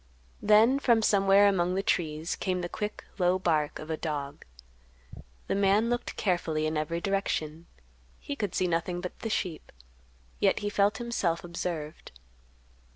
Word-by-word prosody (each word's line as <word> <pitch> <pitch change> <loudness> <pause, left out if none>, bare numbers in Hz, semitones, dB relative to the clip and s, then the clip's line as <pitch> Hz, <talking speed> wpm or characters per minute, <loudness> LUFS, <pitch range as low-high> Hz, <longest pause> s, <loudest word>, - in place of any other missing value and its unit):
Then 220 +6 +5
from 235 -5 +3
somewhere 200 0 +5
among 180 -2 +1
the 195 - 0
trees 160 -3 -1
came 185 -1 -2
the 175 - -3
quick, 210 +3 -5 0.2
low 180 0 +3
bark 155 -5 0
of 155 +1 -7
a 160 - -1
dog. 145 -3 -4 1.0
The - - -1
man 200 +4 +3
looked 240 0 -2
carefully 165 -5 0
in 155 0 -1
every 155 +2 -1
direction; 170 -4 -2 0.5
he 285 - -5
could 205 -8 -3
see 185 - +1
nothing 175 +1 -1
but 180 0 -7
the 225 - -4
sheep, 180 -7 -3 0.7
yet - - +3
he 205 - -1
felt 205 0 +2
himself 220 -9 -1
observed. 170 -3 -5
180 Hz, 155 wpm, -28 LUFS, 165-205 Hz, 1.0 s, Then